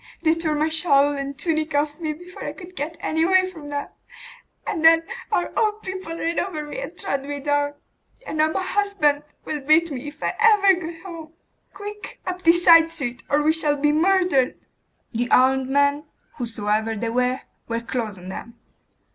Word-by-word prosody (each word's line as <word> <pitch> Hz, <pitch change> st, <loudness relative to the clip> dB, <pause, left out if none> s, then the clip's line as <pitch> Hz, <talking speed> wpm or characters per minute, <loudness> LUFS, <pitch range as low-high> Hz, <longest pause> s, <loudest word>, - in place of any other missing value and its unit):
They 320 Hz, -1 st, +4 dB
tore 330 Hz, -2 st, -1 dB
my 300 Hz, +1 st, +1 dB
shawl 290 Hz, -3 st, +3 dB
and 275 Hz, 0 st, -5 dB
tunic 315 Hz, -1 st, -1 dB
off 295 Hz, +2 st, 0 dB
me 315 Hz, -2 st, -2 dB
before 355 Hz, +4 st, -11 dB
I -, -, -4 dB
could 365 Hz, -1 st, -12 dB
get 325 Hz, +1 st, -4 dB
away 370 Hz, +4 st, +3 dB
from 310 Hz, -5 st, -10 dB
them; 285 Hz, 0 st, -4 dB, 0.8 s
and 320 Hz, -, -2 dB
then 325 Hz, 0 st, +7 dB, 0.3 s
our 350 Hz, -, 0 dB
own 430 Hz, -1 st, +1 dB
people 375 Hz, -3 st, -6 dB
ran 335 Hz, +1 st, -1 dB
over 315 Hz, -6 st, -3 dB
me 295 Hz, -, -6 dB
and -, -, -7 dB
trod 280 Hz, -9 st, -2 dB
me 285 Hz, +1 st, -5 dB
down. 290 Hz, 0 st, 0 dB, 0.5 s
And 310 Hz, -, -4 dB
now 310 Hz, -, +5 dB
my 375 Hz, -, -1 dB
husband 370 Hz, -8 st, +1 dB, 0.2 s
will 300 Hz, -1 st, -3 dB
beat 310 Hz, +4 st, +3 dB
me, 275 Hz, +1 st, -5 dB
if 295 Hz, +1 st, -9 dB
I -, -, 0 dB
ever 420 Hz, -4 st, +6 dB
get 335 Hz, -1 st, -6 dB
home. 330 Hz, -4 st, -9 dB, 0.4 s
Quick! 415 Hz, +1 st, -8 dB
up 365 Hz, 0 st, -4 dB
this 345 Hz, 0 st, +4 dB
side 330 Hz, -1 st, +8 dB
street, 260 Hz, -7 st, -5 dB
or 295 Hz, +1 st, +2 dB
we 310 Hz, +1 st, +4 dB
shall 300 Hz, -2 st, 0 dB
be 295 Hz, +1 st, +2 dB
murdered!' 340 Hz, -4 st, +2 dB, 0.5 s
The 240 Hz, +1 st, -2 dB
armed 260 Hz, +1 st, +4 dB
men, 285 Hz, +2 st, +2 dB, 0.3 s
whosoever 220 Hz, -2 st, -1 dB
they 225 Hz, +2 st, -2 dB
were, 250 Hz, +2 st, 0 dB, 0.3 s
were 230 Hz, 0 st, -2 dB
close 230 Hz, -4 st, -4 dB
on 180 Hz, +1 st, -10 dB
them. 235 Hz, +5 st, -8 dB
310 Hz, 185 wpm, -23 LUFS, 280-345 Hz, 0.8 s, side